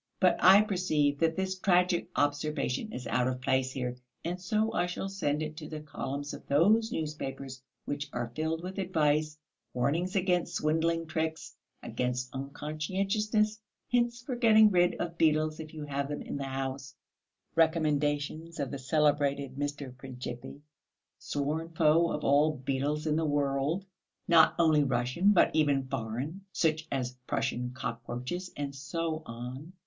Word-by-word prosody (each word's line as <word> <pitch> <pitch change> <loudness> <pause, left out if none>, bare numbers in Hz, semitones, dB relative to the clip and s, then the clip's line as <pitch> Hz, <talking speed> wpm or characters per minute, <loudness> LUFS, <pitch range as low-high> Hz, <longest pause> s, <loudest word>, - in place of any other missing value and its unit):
But 185 -2 +4
I 190 +3 +9
perceive 155 -8 +1
that 165 -1 +2
this 190 0 -2
tragic 180 -2 +2
observation 145 - 0
is 125 - -6
out 125 +1 +1
of 130 0 -2
place 130 0 +1
here, 125 -2 -3 0.3
and 175 +2 -3
so 215 +4 0
I 175 - +1
shall 180 +2 -4
send 155 -6 -1
it 155 0 -5
to 150 -1 -7
the 155 - -5
columns 145 -1 -5
of - - -8
those 210 +11 +4
newspapers 140 - -4 0.2
which 145 +1 -3
are 120 -1 -4
filled 160 +1 -1
with 190 +2 -5
advice, 155 -4 +1 0.4
warnings 160 +10 0
against 180 -2 +1
swindling 165 +2 +1
tricks, 160 0 -3 0.3
against 125 0 -2
unconscientiousness, 195 - -1 0.3
hints 240 -1 +1
for 255 0 -3
getting 220 -3 +6
rid 175 -1 +3
of 170 -1 -4
beetles 155 -1 +2
if 155 -1 -7
you 155 -2 -7
have 140 -1 -2
them 145 - -4
in - - -5
the 140 - -3
house, 135 0 -4 0.6
recommendations 155 0 +1
of 140 -2 -2
the 140 - -4
celebrated 140 -1 +1
Mr. 145 -2 -4
Princhipi, 125 +1 -8 0.6
sworn 150 +3 -2
foe 165 +1 +3
of 150 - -3
all 145 +2 +4
beetles 140 +4 -1
in 155 -1 +1
the 165 - +1
world, 145 +4 0 0.4
not 165 -2 +6
only 160 -3 +4
Russian 130 +8 +1
but 185 - +4
even 145 -4 +3
foreign, 130 - -4
such 160 -2 0
as 125 -2 -1 0.2
Prussian 125 0 -1
cockroaches, 125 +9 -4
and 140 -1 -3
so 155 +3 -3
on. 125 +8 -7
150 Hz, 150 wpm, -30 LUFS, 140-170 Hz, 0.6 s, I